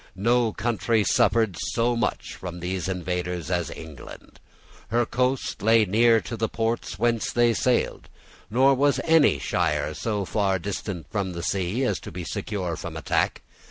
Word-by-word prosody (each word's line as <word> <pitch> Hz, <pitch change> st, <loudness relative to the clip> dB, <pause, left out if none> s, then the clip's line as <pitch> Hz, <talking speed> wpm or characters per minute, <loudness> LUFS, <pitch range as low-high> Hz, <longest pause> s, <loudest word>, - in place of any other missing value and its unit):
No 115 Hz, +3 st, +2 dB
country 115 Hz, -1 st, 0 dB
suffered 110 Hz, 0 st, +2 dB, 0.2 s
so 120 Hz, +1 st, +2 dB
much 115 Hz, -, -2 dB
from 90 Hz, -1 st, -7 dB
these 90 Hz, 0 st, -3 dB
invaders 90 Hz, -2 st, -3 dB
as 85 Hz, -4 st, 0 dB
England. 80 Hz, -5 st, -11 dB, 0.5 s
Her 120 Hz, +3 st, +1 dB
coast 125 Hz, 0 st, -1 dB
lay 110 Hz, +1 st, +5 dB
near 115 Hz, +4 st, +4 dB
to 120 Hz, -, -6 dB
the 110 Hz, -1 st, -1 dB
ports 115 Hz, -4 st, -2 dB
whence 115 Hz, +1 st, +1 dB
they 120 Hz, -1 st, +3 dB
sailed; 125 Hz, +2 st, 0 dB, 0.4 s
nor 130 Hz, +5 st, +4 dB
was 140 Hz, +2 st, +2 dB
any 160 Hz, -3 st, +4 dB
shire 75 Hz, -, 0 dB
so 105 Hz, +4 st, -2 dB
far 100 Hz, -1 st, +1 dB
distant 95 Hz, -3 st, -5 dB
from 100 Hz, -3 st, -2 dB
the 85 Hz, -1 st, -5 dB
sea 95 Hz, +7 st, -1 dB
as 105 Hz, -7 st, 0 dB
to -, -, -9 dB
be 90 Hz, +1 st, -6 dB
secure 95 Hz, -1 st, -3 dB
from -, -, -7 dB
attack. -, -, 0 dB
105 Hz, 160 wpm, -25 LUFS, 90-120 Hz, 0.5 s, lay